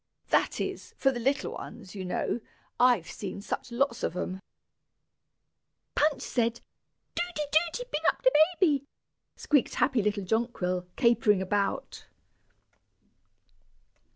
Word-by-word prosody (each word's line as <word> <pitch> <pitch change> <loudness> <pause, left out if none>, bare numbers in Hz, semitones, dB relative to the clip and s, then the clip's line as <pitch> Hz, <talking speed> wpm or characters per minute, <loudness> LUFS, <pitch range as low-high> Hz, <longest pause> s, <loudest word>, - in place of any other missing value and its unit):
"That - - +2
is, - - -4
for 270 - +3
the 245 - -4
little 270 +4 0
ones, 185 - -9
you 195 -2 -5
know; 180 +5 -1 0.4
I've 245 -8 +5
seen 195 -1 -6
such 215 +4 -5
lots 240 0 0
of 175 - -2
'em." 185 +1 -3 1.5
"Punch 300 -1 +2
said, 235 -1 0 0.5
'Doody, 345 -3 -2
Doody, 335 - +2
bing 300 - -1
up - - -3
de - - +6 0.3
baby,'" 290 -7 +3 0.5
squeaked 290 -4 +1
happy 260 -4 +2
little 205 0 0
Jonquil, 185 -4 -1
capering 230 -5 +4
about. 200 +1 -2
235 Hz, 120 wpm, -29 LUFS, 200-280 Hz, 1.5 s, de